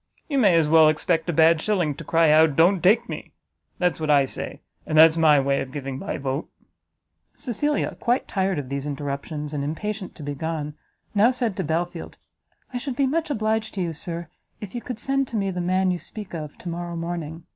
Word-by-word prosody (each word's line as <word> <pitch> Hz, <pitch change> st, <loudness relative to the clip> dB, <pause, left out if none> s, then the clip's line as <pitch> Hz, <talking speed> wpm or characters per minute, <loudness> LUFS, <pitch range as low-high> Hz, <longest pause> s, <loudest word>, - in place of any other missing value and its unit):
you 280 Hz, -3 st, 0 dB
may 200 Hz, -8 st, +5 dB
as 160 Hz, -2 st, +4 dB
well 160 Hz, 0 st, +7 dB
expect 165 Hz, +2 st, 0 dB
a -, -, +1 dB
bad 160 Hz, +1 st, +5 dB
shilling 180 Hz, -8 st, +1 dB
to 165 Hz, -, -9 dB
cry 165 Hz, 0 st, +3 dB
out 155 Hz, -1 st, +5 dB
don't 175 Hz, +4 st, +4 dB
take 220 Hz, +7 st, +4 dB
me! -, -, -7 dB, 0.4 s
That's 180 Hz, -2 st, 0 dB
what 155 Hz, -1 st, -2 dB
I 140 Hz, -2 st, +5 dB
say, -, -, -7 dB, 0.3 s
and 155 Hz, -, 0 dB
that's 160 Hz, 0 st, +8 dB
my 155 Hz, -3 st, +5 dB
way 140 Hz, 0 st, +1 dB
of 130 Hz, -, -6 dB
giving 135 Hz, -2 st, -5 dB
my 200 Hz, -, -4 dB
vote." 135 Hz, +1 st, -3 dB, 0.9 s
Cecilia, 290 Hz, +5 st, -1 dB
quite 245 Hz, +2 st, 0 dB
tired 190 Hz, -2 st, 0 dB
of 140 Hz, -3 st, -4 dB
these 140 Hz, +1 st, -3 dB
interruptions, 145 Hz, +1 st, -4 dB
and 145 Hz, -1 st, -2 dB
impatient 195 Hz, +7 st, -4 dB
to 155 Hz, -, -10 dB
be 145 Hz, 0 st, -3 dB
gone, 155 Hz, 0 st, -4 dB, 0.4 s
now 210 Hz, +3 st, +5 dB
said 245 Hz, -5 st, -1 dB
to 190 Hz, -, -1 dB
Belfield, 165 Hz, +2 st, -3 dB, 0.6 s
"I 245 Hz, -, -2 dB
should 270 Hz, 0 st, -4 dB
be 275 Hz, -, +2 dB
much 315 Hz, +4 st, -1 dB
obliged 220 Hz, -4 st, -1 dB
to 190 Hz, -, -2 dB
you, 170 Hz, -1 st, -3 dB
Sir, 170 Hz, +1 st, -6 dB, 0.3 s
if 205 Hz, -3 st, -8 dB
you 240 Hz, -, -4 dB
could 250 Hz, -2 st, -6 dB
send 275 Hz, +2 st, 0 dB
to 235 Hz, -, -7 dB
me 195 Hz, -2 st, 0 dB
the 180 Hz, -1 st, -3 dB
man 185 Hz, +1 st, +1 dB
you 180 Hz, -, -2 dB
speak 210 Hz, -1 st, -9 dB
of 155 Hz, -3 st, -6 dB
tomorrow 175 Hz, 0 st, -5 dB
morning. 165 Hz, -1 st, -5 dB
170 Hz, 210 wpm, -24 LUFS, 150-210 Hz, 0.9 s, that's